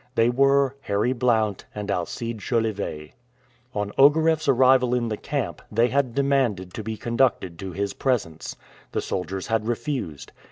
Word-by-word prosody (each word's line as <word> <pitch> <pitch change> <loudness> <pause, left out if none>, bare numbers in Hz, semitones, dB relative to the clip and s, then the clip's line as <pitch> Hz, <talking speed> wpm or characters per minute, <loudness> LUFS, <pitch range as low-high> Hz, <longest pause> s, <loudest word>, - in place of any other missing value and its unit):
They 115 0 +4
were 140 +1 +3
Harry 105 +1 0
Blount 110 -5 +1
and 105 -1 -3
Alcide 115 +5 -3
jolivet. 105 -9 -2 0.6
On 105 -1 -2
Ogareff's 155 +2 +5
arrival 130 -1 +4
in 120 -2 0
the 110 - -1
camp, 140 +3 -3
they 115 +3 +3
had 130 -4 0
demanded 130 -10 +1
to - - -5
be 110 +1 -5
conducted 115 -9 0
to 95 -1 -5
his 100 +2 -2
presence. 105 - -2 0.4
The - - 0
soldiers 95 +1 -3
had 115 -1 -1
refused. 120 - -3
115 Hz, 150 wpm, -24 LUFS, 100-130 Hz, 0.6 s, Ogareff's